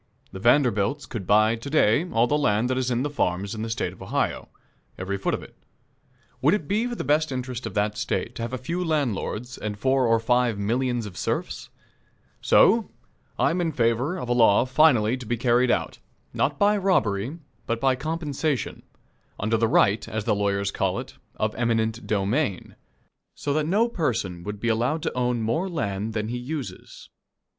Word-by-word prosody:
The 95 - -8
Vanderbilts 120 +2 +2
could 105 -7 -6
buy 110 +2 +4
to 115 +5 -8
day 150 +3 +3
all 115 -4 +3
the 145 - +1
land 120 -4 +1
that 130 - 0
is 130 -1 -1
in 125 +3 0
farms 100 -8 -1
in 110 - -5
the 115 - -3
State 110 - -2
of - - -17
Ohio - - -2 0.5
every 95 +1 -3
foot 100 - -1
of - - -8
it. - - -14 0.9
Would 150 +8 +4
it 160 -9 -5
be 215 +4 +1
for 240 - -4
the - - -4
best 150 +2 +1
interest 125 -1 -4
of - - -9
that 105 +1 0
State 120 - -2
to 120 - -7
have 115 +1 -3
a 130 - -2
few 170 +9 -3
landlords 130 - -2
and 105 -1 -4
four 130 +2 +2
or 115 0 +3
five 120 -1 +1
millions 120 +3 -1
of 95 -4 -9
serfs? - - -3 0.7
So, 225 +1 +4 0.5
I - - +3
am 180 +2 0
in 165 -2 0
favor 125 +6 0
of 125 - -5
a 120 - +1
law 115 -1 +5
finally 130 -4 +4
to 125 - -9
be 120 - -1
carried 120 +1 +3
out - - -1 0.3
not 140 0 0
by 205 +4 +3
robbery, 140 - 0 0.3
but 115 0 -1
by 135 0 +2
compensation, 155 -1 -2 0.6
under 110 +3 +1
the 115 0 +2
right, 110 -2 +3
as 110 -1 -3
the 110 - +2
lawyers 100 -1 0
call 95 -2 -1
it, - - -6 0.2
of 110 0 -1
eminent 115 -1 -1
domain 105 - -1 0.6
so 145 - -2
that 155 0 0
no 210 +7 +3
person 115 - -2
would 105 0 -5
be 115 - -2
allowed 120 +8 0
to - - -2
own 125 -2 0
more 140 - 0
land 105 - -3
than 110 0 -2
he 120 +1 -3
uses. 135 +1 -7
120 Hz, 190 wpm, -25 LUFS, 110-145 Hz, 0.9 s, law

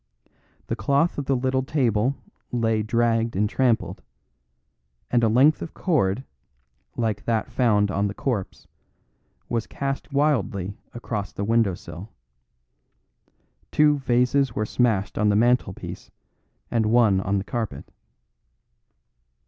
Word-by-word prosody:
The 115 - -2
cloth 140 +10 +1
of 140 - -4
the 135 - +1
little 130 +1 0
table 130 -3 +1 0.4
lay 115 -2 +1
dragged 115 0 +1
and 105 +2 +2
trampled, 110 -7 0 1.1
and 120 -1 +3
a - - +5
length 135 +7 +4
of 160 - -7
cord, 130 - +1 0.7
like 110 -4 -1
that 115 -2 -1
found 105 -5 +2
on 100 +2 0
the 100 - -6
corpse, 115 -9 -3 0.8
was 115 -2 -2
cast 135 +1 -4
wildly 115 -10 0 0.2
across 110 -4 -4
the 100 - -4
windowsill. 100 -4 -1 1.6
Two 150 -1 +4
vases 125 0 +1
were 110 - 0
smashed 110 -5 0
on 105 -1 +3
the 100 - +2
mantelpiece 120 -3 0 0.6
and 115 -2 +1
one 110 -4 +4
on 100 +1 0
the 95 - -1
carpet. 115 0 -5
115 Hz, 120 wpm, -24 LUFS, 105-130 Hz, 1.6 s, a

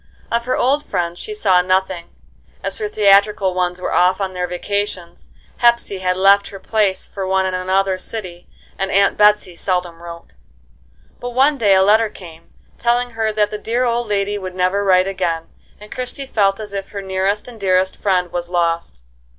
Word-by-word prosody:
Of 235 0 0
her 255 - 0
old 280 +4 +2
friends 175 - -3
she 425 - -5
saw 185 - +3
nothing, 185 -1 -1 0.5
as - - -2
her 425 -1 -2
theatrical 200 - +3
ones 180 0 -1
were - - -3
off 185 +2 +3
on 190 -1 -3
their 180 -1 -2
vacations, 185 -1 -4 0.3
Hepsey 235 -5 +2
had 180 0 0
left 200 +1 +5
her 195 - -9
place 205 -2 0
for 195 -2 -5
one 190 0 +1
in 185 - -2
another 185 +1 0
city, 185 -5 -7 0.3
and 195 - -1
Aunt 200 +1 +3
Betsey 210 -3 +3
seldom 175 -2 -3
wrote. 170 - -11 0.9
But 245 0 -6
one 275 +2 +3
day 200 -3 +4
a 190 - +5
letter 215 +2 +4
came, 165 -5 -14 0.3
telling 240 +1 +1
her 225 -1 -1
that 210 -1 0
the 210 - -5
dear 235 +4 -1
old 240 -1 0
lady 205 0 -1
would 185 -1 -7
never 185 +2 +1
write 185 -1 +4
again, 175 -4 -2 0.3
and 210 +1 -13
Christie 255 +2 -5
felt 200 -5 +1
as 210 -2 -7
if 195 -1 -5
her 200 -1 -6
nearest 190 +3 -1
and 235 -3 -11
dearest 185 -1 +1
friend 180 -3 0
was 175 0 -4
lost. 170 - -1
195 Hz, 185 wpm, -19 LUFS, 185-210 Hz, 0.9 s, left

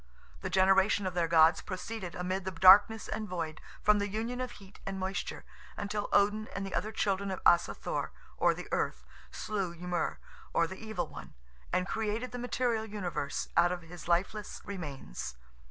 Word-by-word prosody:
The - - -3
generation 190 +1 +4
of 185 - -1
their 170 -1 +1
gods 160 0 +6
proceeded 185 -1 -5
amid 185 +1 -2
the 190 - -2
darkness 190 +5 +7
and 215 -1 -4
void, 165 -4 -4 0.2
from 210 0 +5
the 205 - 0
union 230 +5 -3
of 255 -1 -4
heat 195 0 -14
and 195 0 -4
moisture, 190 +1 -3 0.3
until 205 0 -2
Odin 210 +2 +3
and 195 - -2
the 195 - -6
other 215 - -1
children 200 -2 0
of 190 - -3
Asa 170 - +5
Thor, - - -3 0.2
or - - +3
the - - -7
Earth, - - -1 0.2
slew 195 -5 -3
Ymer, 180 +1 -2 0.4
or 170 - +4
the 190 +5 -8
Evil 220 -4 -2
One, - - -10 0.4
and 185 +1 +1
created 225 +3 -2
the 245 - -5
material 240 -2 0
universe 180 -9 -3
out 175 +1 +5
of 180 -2 -4
his 170 +1 -10
lifeless 195 +5 0
remains. 145 - -6
195 Hz, 175 wpm, -31 LUFS, 175-215 Hz, 0.4 s, darkness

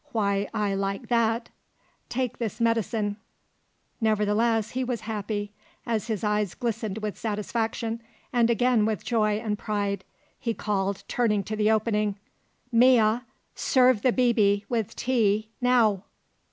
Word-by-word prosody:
Why, 200 -2 0
I 210 -2 0
like 195 +4 -3
that! 230 -1 +1 0.6
Take 250 -1 -2
this 225 -3 -3
medicine!" 225 -2 0 0.8
Nevertheless 220 +1 +2
he 260 +1 -1
was 245 -3 -2
happy; 205 -1 -3 0.3
as 225 -1 -1
his 220 -3 -2
eyes 210 -3 0
glistened 225 -4 -3
with 210 -2 -4
satisfaction 225 +1 -2 0.3
and 235 -1 +3
again 235 -1 +3
with 215 -5 -2
joy 215 -3 +2
and 210 -1 -2
pride, 205 -1 -2 0.4
he 230 -2 -2
called, 200 -2 -1
turning 210 -4 +1
to 215 +3 -4
the 215 0 +2
opening: 215 -2 +1 0.5
"Mea, 235 -2 +5 0.3
serve 255 -4 +3
the 255 - +3
'bibi' 215 -5 +2
with 225 -3 -2
tea, 220 -4 +1
now!" 230 -6 +3
220 Hz, 130 wpm, -26 LUFS, 205-235 Hz, 0.8 s, Mea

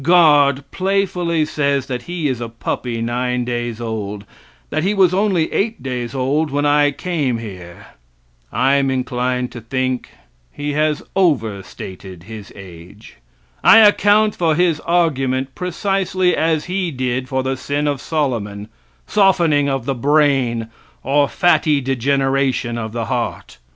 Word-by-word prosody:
Guard 145 -4 +4
playfully 180 -4 0
says 140 -3 0
that 125 -2 -4
he 175 -4 -1
is 130 -3 -2
a 115 - -4
puppy 115 0 -4
nine 125 +1 -1
days 120 -2 -3
old; 105 -3 -5 0.5
that 155 - 0
he 195 +5 0
was 185 -3 +4
only 190 -4 +1
eight 225 +2 -1
days 125 -1 -4
old 140 +4 0
when 145 +1 -1
I 145 0 +4
came 145 -5 -2
here. 90 -6 -9 0.7
I'm 135 +2 +2
inclined 125 -1 -1
to 120 - -8
think 130 +2 -2 0.4
he 145 0 -4
has 150 0 0
over 120 - +1
stated 95 -1 -10
his 105 0 -10
age. 95 - -13 0.5
I - - +8
account 210 0 +5
for 165 -3 +1
his 170 -2 +2
argument 135 -7 0
precisely 185 0 0
as 160 -1 0
he 185 0 -2
did 130 -2 -3
for 130 0 -1
the 130 0 -1
sin 145 +3 -2
of 145 -2 -1
Solomon, 110 -9 -2 0.4
softening 170 -8 +3
of 135 -3 -2
the 135 - 0
brain, 135 -4 +1 0.3
or 140 +2 +2
fatty 155 -4 +3
degeneration 135 -1 0
of 110 -2 -4
the 115 0 -3
heart. 65 - -4
135 Hz, 140 wpm, -19 LUFS, 120-160 Hz, 0.7 s, I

